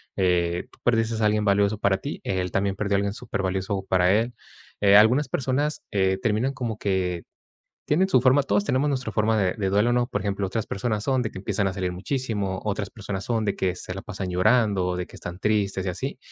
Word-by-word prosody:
eh, 90 -2 +1
tú - - -21
perdiste 115 -1 +1
a - - +3
alguien 105 0 +2
valioso 100 +1 +2
para 100 -2 +2
ti. 140 +10 -6
Él 90 -1 -1
también 100 0 0
perdió 100 0 0
a - - +4
alguien 100 0 -1
super 110 -3 -4
valioso 95 +1 -2
para 90 0 +3
él, 115 +3 +1 0.5
eh, 100 -1 +6
algunas 125 +8 +5
personas, 140 +3 -1
eh, 95 -1 +2
terminan 115 +4 +1
como 120 -5 -4
que 90 -3 -1 0.7
tienen 180 +6 +3
su 180 - +4
forma. 130 +3 +4
Todos 200 +8 +1
tenemos 145 -5 +1
nuestra 130 -3 -2
forma 110 0 +2
de 95 -3 +2
de 100 -4 -1
duelo, 105 +5 +3
¿no? 120 0 +1
Por 105 - -2
ejemplo, 100 0 -2
otras 110 +2 -2
personas 105 +1 -2
son 130 -2 +1
de 110 - -3
que - - -8
empiezan 100 0 -1
a - - -3
salir 90 -2 -2
muchísimo. 100 -2 -2
Otras 105 -1 -2
personas 100 -4 -5
son 115 -2 0
de 100 - 0
que 90 -1 -1
se 90 - -6
la 95 - -6
pasan 100 -2 -5
llorando, 95 -1 +2
de 90 0 -3
que - - -18
están 90 0 -7
tristes 100 -2 0
y - - 0
así. 130 +9 -4
100 Hz, 225 wpm, -25 LUFS, 95-120 Hz, 0.7 s, eh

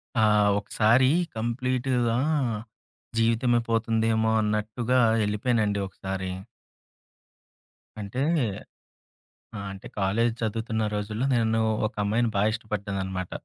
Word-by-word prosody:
ఆ! 110 - +3 0.4
ఒకసారి 115 +5 +3 0.3
కంప్లీటుగా, 125 0 0 1.0
జీవితమే 115 +1 +3
పోతుందేమో 110 -1 +1
అన్నట్టుగా 110 +4 0 0.3
ఎళ్ళిపోయానండి 105 -1 0
ఒకసారి. 95 0 -5 1.7
అంటే 105 +5 -4 1.4
ఆ! - - -5
అంటే, 95 0 -9
కాలేజ్ 105 +5 +2
చదువుతున్న 110 0 -1
రోజుల్లో 105 +4 -2
నేను 115 -1 +2 0.3
ఒక 110 - -12
అమ్మాయిని 110 +3 +1
బాగా 100 +2 +3
ఇష్టపడ్డానన్నమాట. 100 -4 -4
110 Hz, 85 wpm, -26 LUFS, 105-120 Hz, 1.7 s, ఆ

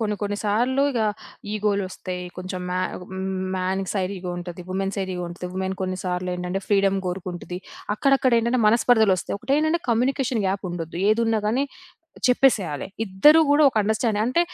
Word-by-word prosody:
కొన్ని 210 -2 0
కొన్ని 205 0 -1
సార్లు 245 +6 +2
ఇగా 225 -4 +1 0.5
ఇగోలొస్తాయి 195 -3 -2
కొంచెం 185 0 -5
మ్యా 180 0 0 0.8
మ్యాన్ 185 +1 -1
సైడ్ 195 -1 -1
ఇగో 180 0 -5
ఉంటది, 175 0 -7
వుమెన్ 195 +1 -1
సైడ్ 190 -1 -2
ఇగో 180 0 -3
ఉంటది, 175 +1 -7
వుమెన్ 190 0 -2
కొన్ని 185 0 -2
సార్లు 180 0 -2
ఏంటంటే, 180 +2 -3
ఫ్రీడమ్ 195 -1 +3
కోరుకుంటది. 180 -1 -5 0.4
అక్కడక్కడ 270 +2 +3
ఏంటంటే, 235 +2 +1
మనస్పర్ధలు 220 -2 +4
వస్తాయి. 185 - -4
ఒకటేంటంటే 305 +7 +1
కమ్యూనికేషన్ 245 0 +1
గ్యాప్ 195 +1 -1
ఉండొద్దు, 170 -1 -5
ఏదున్నా 225 0 +2
గాని 255 +5 +1 0.6
చెప్పేసేయాలి. 230 - +2 0.2
ఇద్దరూ 295 +12 +6
కూడా 290 +1 +5
ఒక - - -16
అండర్‌స్టాండింగ్ 220 0 +1
అంటే 255 +7 +2
200 Hz, 155 wpm, -24 LUFS, 185-235 Hz, 0.8 s, ఇద్దరూ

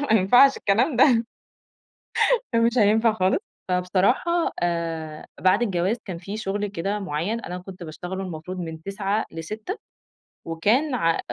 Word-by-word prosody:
ما - - +5
ينفعش 250 +8 +6
الكلام 235 +7 +1
ده، 240 -3 +5 1.3
ده 230 - +4
مش 235 +2 +2
هينفع 220 +2 +4
خالص. 185 -3 +1 0.3
فبصراحة 190 - +1
آآ 165 -3 -3
بعد 190 +5 +3
الجواز 190 +1 0
كان 180 -4 -6
في 195 +4 -6
شُغل 205 -1 -2
كده 200 +1 -3
مُعيّن، 195 +5 -2
أنا 180 -3 -6
كنت 185 0 -11
باشتغله 180 +4 -6
المفروض 180 +1 -6
من 160 -2 -6
09:00 200 +3 -1
ل18:00 215 - -6 0.7
وكان 225 - +1
ع 165 -7 +1
195 Hz, 140 wpm, -24 LUFS, 175-225 Hz, 1.3 s, ينفعش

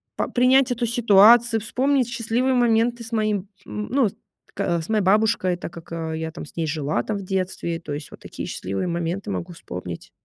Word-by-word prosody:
по - - -2
принять 255 +1 +4
эту 240 0 0
ситуацию, 230 0 +5
вспомнить 260 +4 +1
счастливые 240 +2 0
моменты 235 0 +2
с 225 - -9
моим, 210 -3 0 0.2
м, 210 0 -5
ну, 265 -3 +3
с - - -18 0.4
к 170 -2 -1
с 160 - -8
моей 215 -3 +2
бабушкой, 200 -2 +2
так 175 - -7
как, 170 0 -12
э, 160 -1 -3
я 160 0 -4
там 165 - -8
с - - -16
ней 165 - -1
жила, 145 -5 -1
там 210 - -3
в 200 - -6
детстве, 185 -3 -2
то 150 - -9
есть 145 0 -6
вот - - -12
такие - - -7
счастливые 95 - -3
моменты 175 +4 -3
могу 175 -1 -4
вспомнить. 90 - -8
205 Hz, 205 wpm, -23 LUFS, 170-235 Hz, 0.4 s, ситуацию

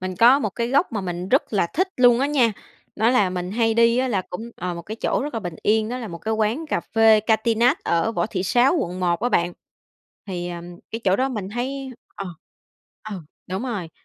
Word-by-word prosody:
mình 185 0 -4
có 240 +7 +7
một 215 -8 -1
cái 235 +4 -2
góc 280 +5 +2
mà 215 - -1
mình 180 -1 -4
rất 265 +2 +2
là 195 -5 +2
thích 370 +4 +1
luôn 245 -1 +5
á 275 - +2
nha. 260 -6 +3 0.4
Đó 225 +3 +3
là 210 -7 +3
mình 180 0 -4
hay 225 0 +2
đi 230 +1 +4
á 260 0 +1
là 195 -5 0
cũng 225 +6 -6
ờ, 180 -1 -3
một 170 - -7
cái 220 +5 -7
chỗ - - 0
rất 290 -4 -5
là 225 - -2
bình 175 -4 -5
yên, 215 +1 +2
đó 250 +2 -3
là 230 -4 -6
một 170 -1 -7
cái 220 +4 -2
quán 220 +9 0
cà - - -1
phê 225 -1 +4
Katinat 230 +5 +2
ở 170 +7 +1
Võ - - 0
Thị 190 -4 -3
Sáu, 245 - +3
quận 185 - -3
1 175 -1 +1
á 245 - +1
bạn, 175 -6 +1 0.7
thì, 175 -2 -4
ừm, 175 0 -8
cái 225 - -4
chỗ 190 -1 +3
đó 260 +1 +1
mình 210 -7 -4
thấy 265 +4 -4 0.2
ờ, 195 - -6 0.8
ừ, 190 -4 -5 0.3
đúng 190 +5 -3
rồi. 205 -10 -4
220 Hz, 240 wpm, -23 LUFS, 185-245 Hz, 0.8 s, có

